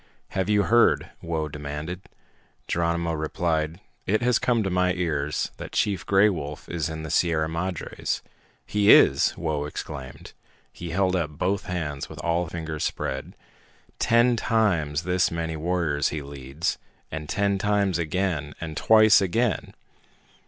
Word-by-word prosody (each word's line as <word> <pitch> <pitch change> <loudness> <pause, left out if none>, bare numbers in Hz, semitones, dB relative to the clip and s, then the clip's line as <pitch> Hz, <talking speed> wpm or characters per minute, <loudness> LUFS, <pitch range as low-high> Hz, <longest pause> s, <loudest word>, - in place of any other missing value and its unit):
"Have 95 0 -2
you 105 -1 +4
heard?" 120 +4 +3
Whoa 80 -2 -2
demanded. 75 +4 -6 0.7
Geronimo 85 0 0
replied, 80 +1 -1 0.3
"It 110 +4 +1
has 125 -1 +3
come 120 -3 +1
to 95 - -2
my 90 0 +2
ears 75 -5 -1
that - - -8
Chief 95 -5 0
Gray 100 +2 +5
Wolf 75 -7 -4
is 80 -2 -2
in 80 0 -5
the 80 - -5
Sierra 80 -2 +2
Madres." 85 +2 -3 0.4
"He 105 -1 +4
is!" 70 - +6
Whoa 75 -3 -2
exclaimed. 65 -3 -7 0.4
He 85 - -7
held 95 +2 +1
up 85 -4 0
both 90 +6 -2
hands 75 -6 -3
with - - -10
all 85 +1 +1
fingers 80 -2 -4
spread. - - -3 0.6
"Ten 120 +1 +4
times 85 -10 +1
this 90 +1 +2
many 80 -1 -3
warriors 80 -3 0
he 75 -2 -4
leads, 70 +3 -4 0.3
and 75 -1 -6
ten 100 -1 +1
times 100 -3 +1
again, 80 -4 -1
and 80 -2 -6
twice 110 +1 +6
again! 105 +3 0
85 Hz, 145 wpm, -25 LUFS, 75-95 Hz, 0.7 s, is